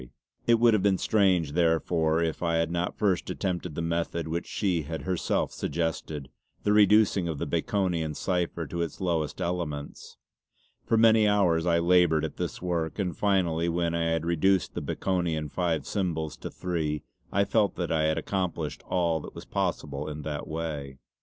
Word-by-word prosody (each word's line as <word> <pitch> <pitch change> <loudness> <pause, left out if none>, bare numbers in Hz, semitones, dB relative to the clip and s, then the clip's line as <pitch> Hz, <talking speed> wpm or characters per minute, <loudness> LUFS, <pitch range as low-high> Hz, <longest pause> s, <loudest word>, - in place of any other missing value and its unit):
It 120 - +6
would 115 0 +5
have 105 - +3
been 95 -1 +3
strange 95 -9 +2
therefore 80 0 +2
if 80 -1 -2
I 85 -1 +1
had 80 0 +1
not 85 +1 -2
first 95 -4 +1
attempted 90 -4 -3
the 85 - -2
method 85 0 -1
which 85 +2 -3
she 90 -5 0
had 80 +2 -5
herself 90 -2 0
suggested, 80 -3 -3 0.3
the 105 - +3
reducing 105 -2 +5
the 80 -4 -2
Baconian 85 -6 -1
cipher 85 -2 -1
to 85 +3 -4
its 85 - -4
lowest 85 -5 -1
elements. 80 -5 -4 0.7
For 115 - +1
many 110 -1 +6
hours 90 -5 +3
I 85 -1 +4
laboured 85 -2 +4
at - - -7
this - - -4
work, 85 -3 -1
and 90 -5 -2
finally 85 -5 +1
when 85 0 0
I 85 0 0
had 80 0 0
reduced 85 +2 +2
the - - -3
Baconian 85 -5 -1
five 85 -3 -1
symbols 80 -6 -2
to - - -6
three 80 -4 -2 0.3
I 100 +1 +2
felt 105 0 +2
that 85 -2 -3
I 80 -1 +2
had 80 0 +1
accomplished 95 -3 -2
all 85 -3 +1
that - - -10
was - - -9
possible 75 +1 -2
in 75 0 -6
that 75 -1 -4
way. 75 -4 -4
85 Hz, 170 wpm, -27 LUFS, 80-95 Hz, 0.7 s, It